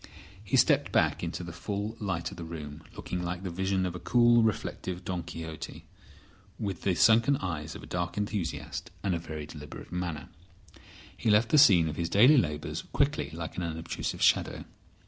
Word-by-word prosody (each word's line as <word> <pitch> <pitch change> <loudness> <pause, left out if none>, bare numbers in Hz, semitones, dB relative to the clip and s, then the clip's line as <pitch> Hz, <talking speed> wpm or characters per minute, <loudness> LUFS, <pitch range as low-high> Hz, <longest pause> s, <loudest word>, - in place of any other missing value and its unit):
He 100 - +1
stepped - - +4
back - - +2
into - - -3
the 85 - -6
full 100 +5 -4
light 90 -5 -2
of - - -10
the 85 - -6
room, 80 -2 -7
looking 90 - -4
like 90 +1 -4
the 95 - -3
vision 95 +1 0
of 90 - -2
a 90 - -6
cool, 120 +5 +5
reflective 95 -4 -2
Don 90 -1 -2
Quixote, 80 -2 -7 0.7
with 100 -4 -4
the 95 -3 +1
sunken 115 +7 +5
eyes 80 -4 -4
of - - -9
a - - -8
dark 85 +1 -3
enthusiast 100 -4 -3
and 100 -2 +1
a 85 - -1
very 80 -2 -6
deliberate 75 -1 -10
manner. 85 -5 -4 0.9
He 115 - -1
left 105 +2 +4
the 150 - +6
scene 95 - +7
of 75 -1 -4
his 85 -1 -1
daily 125 - +7
labours 75 -4 -2
quickly 75 -1 0
like 80 0 -6
an - - -1
unobtrusive 80 -1 -3
shadow. - - +2
90 Hz, 185 wpm, -29 LUFS, 80-100 Hz, 0.9 s, scene